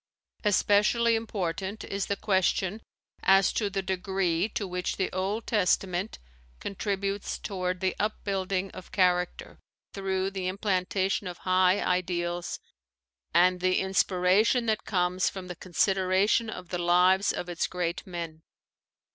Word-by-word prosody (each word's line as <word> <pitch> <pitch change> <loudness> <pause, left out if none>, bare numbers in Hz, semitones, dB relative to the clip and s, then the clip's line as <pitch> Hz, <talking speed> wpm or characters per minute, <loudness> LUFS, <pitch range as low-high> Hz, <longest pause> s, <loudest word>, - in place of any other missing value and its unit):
Especially 210 +3 +3
important 195 -2 -3
is 200 -1 -3
the 200 - 0
question 190 +1 0 0.4
as 195 0 +4
to 210 -3 0
the 195 0 -2
degree 190 0 0
to 205 -2 -3
which 180 0 -3
the 190 - -1
Old 195 +4 -2
Testament 190 -1 0 0.4
contributes 200 0 -3
toward 185 -2 -3
the 185 -1 0
upbuilding 195 -2 -1
of 185 - -11
character 180 -2 0 0.3
through 190 -1 -1
the 190 -2 -3
implantation 190 0 0
of 180 - -6
high 185 +1 +3
ideals 175 -1 -1 0.7
and 180 +1 +4
the 185 0 +2
inspiration 190 +5 +2
that 220 -1 0
comes 180 -2 +1
from 190 -2 -8
the 180 - -5
con 180 +1 -13
sideration 195 +5 +2
of 180 -4 -8
the 180 - -3
lives 180 +3 +4
of 180 - -4
its 175 -1 -1
great 175 -1 -3
men. 170 -3 -6
190 Hz, 130 wpm, -28 LUFS, 180-200 Hz, 0.7 s, as